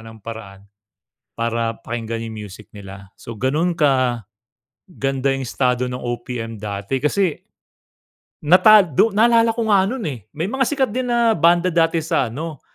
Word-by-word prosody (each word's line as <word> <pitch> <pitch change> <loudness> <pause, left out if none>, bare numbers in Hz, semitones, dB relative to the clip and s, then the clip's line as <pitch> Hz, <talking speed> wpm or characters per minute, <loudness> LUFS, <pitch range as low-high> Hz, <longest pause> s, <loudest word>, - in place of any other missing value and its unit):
ng 110 - -13
paraan 110 -4 -9 0.7
para 115 0 -2
pakinggan 115 -1 -5
yung 110 -2 -7
music 100 +2 -13
nila. 100 -1 -11
So, 115 - -9
ganun 150 +9 0
kaganda 125 - 0 0.9
yung 135 -1 -4
estado 125 0 0
ng 125 - -4
OPM 120 -2 -5
dati 105 +4 -3
kasi 170 +3 0 1.0
natag 180 - +5
do 225 - +4
naalala 230 +2 +4
ko 225 0 -3
nga 200 -3 +4
nun, 245 -3 -4
eh, 115 -7 -7
may 160 +5 -3
mga 265 +4 0
sikat 275 -3 0
din 250 0 -2
na 235 -1 +3
banda 170 +2 +3
dati 165 0 +2
sa 155 -7 -1
ano, 155 +3 -6
135 Hz, 150 wpm, -20 LUFS, 115-180 Hz, 1.0 s, natag